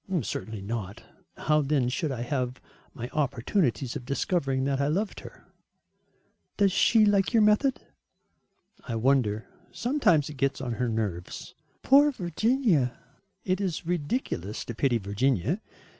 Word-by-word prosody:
"Certainly 105 Hz, 0 st, -5 dB
not. 105 Hz, 0 st, -5 dB, 0.3 s
How 150 Hz, 0 st, +2 dB
then 140 Hz, -3 st, +1 dB
should 140 Hz, +4 st, -1 dB
I 120 Hz, -3 st, -3 dB
have 125 Hz, -1 st, -2 dB, 0.4 s
my 120 Hz, -, -5 dB
opportunities 135 Hz, -, 0 dB
of -, -, -5 dB
discovering 135 Hz, 0 st, 0 dB
that 135 Hz, 0 st, 0 dB
I 140 Hz, -, +1 dB
loved 195 Hz, +8 st, -1 dB
her?" -, -, -13 dB, 1.1 s
"Does 200 Hz, -2 st, +4 dB
she 220 Hz, +3 st, +4 dB
like 200 Hz, +1 st, +2 dB
your 225 Hz, -2 st, +5 dB
method?" 215 Hz, +6 st, +3 dB, 1.0 s
"I 115 Hz, -, -4 dB
wonder. 115 Hz, -3 st, +1 dB, 0.3 s
Sometimes 235 Hz, -, +2 dB
it 150 Hz, -, -8 dB
gets 135 Hz, 0 st, 0 dB
on 130 Hz, -2 st, -3 dB
her 125 Hz, -, +1 dB
nerves." 105 Hz, -6 st, -4 dB, 0.3 s
"Poor 285 Hz, +2 st, +6 dB
Virginia." 185 Hz, -, +1 dB, 0.5 s
"It 185 Hz, +1 st, 0 dB
is 180 Hz, -3 st, -2 dB
ridiculous 150 Hz, -, -2 dB
to 120 Hz, -, -5 dB
pity 120 Hz, +1 st, +1 dB
Virginia. 115 Hz, -, 0 dB
140 Hz, 135 wpm, -27 LUFS, 120-190 Hz, 1.1 s, Poor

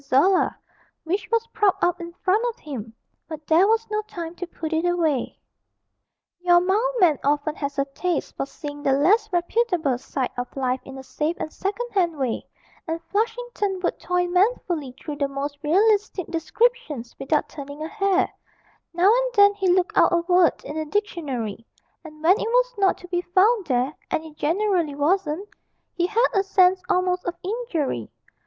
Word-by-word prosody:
Zola, 285 Hz, +8 st, +3 dB, 0.5 s
which 370 Hz, +5 st, -2 dB
was 460 Hz, 0 st, +2 dB
propped 415 Hz, -3 st, +2 dB
up 350 Hz, 0 st, +1 dB
in 340 Hz, 0 st, -7 dB
front 400 Hz, +5 st, +3 dB
of 470 Hz, -, -8 dB
him, 240 Hz, -7 st, -7 dB, 0.4 s
but 310 Hz, -2 st, -8 dB
there 330 Hz, +6 st, +5 dB
was 450 Hz, +1 st, +2 dB
no 425 Hz, 0 st, 0 dB
time 340 Hz, -6 st, -7 dB
to 360 Hz, -, -5 dB
put 325 Hz, -2 st, -5 dB
it 320 Hz, +1 st, +1 dB
away. 335 Hz, -7 st, 0 dB, 1.0 s
Your 350 Hz, 0 st, +5 dB
mild 420 Hz, +8 st, +1 dB
man 325 Hz, -6 st, +4 dB
often 290 Hz, +2 st, +1 dB
has 280 Hz, -1 st, -4 dB
a 275 Hz, -, +2 dB
taste 325 Hz, +4 st, -3 dB
for 275 Hz, -, -3 dB
seeing 290 Hz, 0 st, -8 dB
the 275 Hz, -1 st, +2 dB
less 405 Hz, +10 st, +3 dB
reputable 345 Hz, -, +1 dB
side 260 Hz, 0 st, -3 dB
of 245 Hz, -, -6 dB
life 255 Hz, -1 st, 0 dB
in 270 Hz, 0 st, -9 dB
a 265 Hz, -, -8 dB
safe 300 Hz, +5 st, -2 dB
and 310 Hz, -, -5 dB
second 415 Hz, +5 st, -3 dB
hand 350 Hz, -6 st, +1 dB
way, 260 Hz, -4 st, -2 dB, 0.4 s
and 325 Hz, 0 st, -2 dB
Flushington 440 Hz, -2 st, -1 dB
would -, -, -1 dB
toil 360 Hz, 0 st, 0 dB
manfully 355 Hz, -, 0 dB
through 295 Hz, -2 st, -6 dB
the 280 Hz, -1 st, 0 dB
most 280 Hz, +1 st, -5 dB
realistic 395 Hz, +3 st, +2 dB
descriptions 330 Hz, -, -1 dB
without 295 Hz, +2 st, 0 dB
turning 285 Hz, +1 st, -8 dB
a -, -, -3 dB
hair; 395 Hz, 0 st, +1 dB, 0.7 s
now 355 Hz, +2 st, +4 dB
and -, -, +1 dB
then 405 Hz, 0 st, +7 dB
he 385 Hz, -3 st, +1 dB
looked 365 Hz, 0 st, +1 dB
out -, -, +5 dB
a 345 Hz, -1 st, +3 dB
word 355 Hz, -3 st, +3 dB
in 300 Hz, -, -6 dB
the 315 Hz, -, -2 dB
dictionary, 295 Hz, -, -3 dB, 0.4 s
and 310 Hz, -1 st, -12 dB
when 370 Hz, +6 st, +5 dB
it -, -, -2 dB
was -, -, +2 dB
not 390 Hz, -1 st, +3 dB
to 360 Hz, -, -12 dB
be 350 Hz, -1 st, 0 dB
found 385 Hz, +4 st, +2 dB
there 255 Hz, +1 st, +1 dB, 0.2 s
and 315 Hz, -, -1 dB
it 310 Hz, -1 st, -12 dB
generally 340 Hz, -2 st, 0 dB
wasn't 335 Hz, +4 st, 0 dB, 0.5 s
he 350 Hz, 0 st, 0 dB
had 450 Hz, +5 st, +3 dB
a 390 Hz, -, +3 dB
sense 375 Hz, -1 st, +3 dB
almost 365 Hz, 0 st, +1 dB
of 350 Hz, -, -2 dB
injury. 360 Hz, -, -2 dB
350 Hz, 180 wpm, -24 LUFS, 295-395 Hz, 1.0 s, then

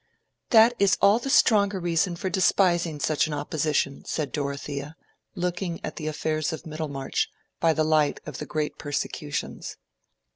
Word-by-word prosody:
"That 230 Hz, +1 st, +7 dB
is 200 Hz, 0 st, +4 dB
all 205 Hz, +3 st, +5 dB
the 275 Hz, -, -5 dB
stronger 205 Hz, -8 st, +4 dB
reason 175 Hz, +1 st, 0 dB
for 180 Hz, -, -4 dB
despising 175 Hz, -3 st, +2 dB
such 155 Hz, +1 st, +1 dB
an 150 Hz, -, -3 dB
opposition," 145 Hz, -1 st, -1 dB
said 150 Hz, -3 st, -3 dB
Dorothea, 140 Hz, +1 st, -4 dB, 0.4 s
looking 175 Hz, -1 st, -2 dB
at -, -, -6 dB
the 155 Hz, -, -4 dB
affairs 155 Hz, +1 st, -1 dB
of 160 Hz, +2 st, -7 dB
Middlemarch 150 Hz, -4 st, -3 dB, 0.3 s
by 165 Hz, -1 st, +3 dB
the 155 Hz, -, +1 dB
light 155 Hz, -2 st, +2 dB
of 150 Hz, -4 st, -7 dB
the -, -, -6 dB
great 150 Hz, -1 st, -3 dB
persecutions. 145 Hz, 0 st, -4 dB
160 Hz, 150 wpm, -26 LUFS, 150-180 Hz, 0.4 s, That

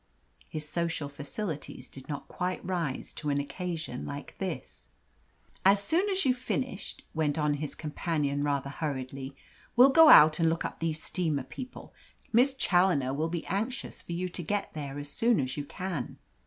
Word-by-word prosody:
His 155 Hz, -1 st, -4 dB
social 165 Hz, -3 st, -1 dB
facilities 145 Hz, -1 st, -5 dB
did 135 Hz, +1 st, -12 dB
not 145 Hz, -, -4 dB
quite 180 Hz, 0 st, -3 dB
rise 170 Hz, -8 st, -2 dB
to 150 Hz, -, -4 dB
an 140 Hz, 0 st, +2 dB
occasion 160 Hz, -3 st, -4 dB
like 145 Hz, 0 st, -7 dB
this. 180 Hz, -, -5 dB, 0.7 s
"As 195 Hz, +1 st, +6 dB
soon 335 Hz, -, +1 dB
as 385 Hz, -4 st, +1 dB
you've 255 Hz, -1 st, +2 dB
finished," 255 Hz, -4 st, -3 dB
went 155 Hz, -1 st, 0 dB
on 150 Hz, -1 st, +2 dB
his 145 Hz, 0 st, -4 dB
companion 150 Hz, -2 st, -1 dB
rather 140 Hz, -1 st, 0 dB
hurriedly, 135 Hz, -2 st, -4 dB, 0.4 s
"we'll 255 Hz, +3 st, +8 dB
go 325 Hz, +2 st, +8 dB
out 155 Hz, -, +9 dB
and 165 Hz, -1 st, +4 dB
look 165 Hz, +1 st, -1 dB
up -, -, -5 dB
these 160 Hz, -1 st, -1 dB
steamer 155 Hz, -7 st, 0 dB
people. 255 Hz, -, -9 dB, 0.4 s
Miss 260 Hz, +4 st, +5 dB
Challoner 175 Hz, -, +3 dB
will 155 Hz, +4 st, 0 dB
be 170 Hz, -1 st, -3 dB
anxious 225 Hz, +8 st, -3 dB
for 170 Hz, -, -6 dB
you 180 Hz, +2 st, -1 dB
to 180 Hz, 0 st, -5 dB
get 205 Hz, +4 st, -2 dB
there 145 Hz, -2 st, -5 dB
as 145 Hz, 0 st, -5 dB
soon 235 Hz, +5 st, +3 dB
as 130 Hz, -2 st, -1 dB
you 145 Hz, -, -4 dB
can." 180 Hz, -6 st, -4 dB
160 Hz, 170 wpm, -29 LUFS, 145-190 Hz, 0.7 s, out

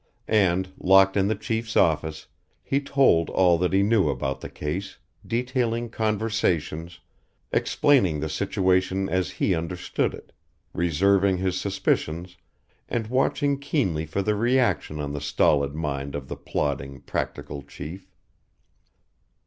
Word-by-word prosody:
And, 95 Hz, -3 st, +2 dB
locked 95 Hz, +1 st, +5 dB
in 100 Hz, -1 st, +2 dB
the 110 Hz, -, +1 dB
Chief's 110 Hz, +2 st, -3 dB
office, 80 Hz, -2 st, +1 dB, 0.4 s
he 140 Hz, +1 st, 0 dB
told 135 Hz, -12 st, +3 dB
all 90 Hz, -3 st, +3 dB
that 90 Hz, 0 st, +1 dB
he 95 Hz, +1 st, +3 dB
knew 100 Hz, -6 st, +3 dB
about 70 Hz, 0 st, -2 dB
the -, -, -6 dB
case, 90 Hz, +7 st, -5 dB, 0.3 s
detailing 120 Hz, -1 st, -1 dB
conversations, 100 Hz, -7 st, -1 dB, 0.5 s
explaining 120 Hz, -, +2 dB
the 80 Hz, -, -2 dB
situation 95 Hz, +2 st, +1 dB
as 95 Hz, 0 st, 0 dB
he 95 Hz, -, 0 dB
understood 85 Hz, -1 st, -2 dB
it, -, -, -15 dB, 0.4 s
reserving 95 Hz, +3 st, +2 dB
his 95 Hz, 0 st, -1 dB
suspicions 90 Hz, -3 st, -1 dB, 0.5 s
and 115 Hz, -2 st, -1 dB
watching 140 Hz, +1 st, +1 dB
keenly 95 Hz, -, -1 dB
for 95 Hz, +6 st, -2 dB
the 105 Hz, -, +1 dB
reaction 115 Hz, -8 st, +1 dB
on 70 Hz, -1 st, -3 dB
the 75 Hz, -, -4 dB
stolid 70 Hz, 0 st, +2 dB
mind 70 Hz, -3 st, -3 dB
of 70 Hz, -2 st, -6 dB
the -, -, -4 dB
plodding, 70 Hz, -2 st, -3 dB
practical 70 Hz, 0 st, -4 dB
Chief. 75 Hz, +6 st, -9 dB
95 Hz, 130 wpm, -25 LUFS, 80-110 Hz, 0.5 s, locked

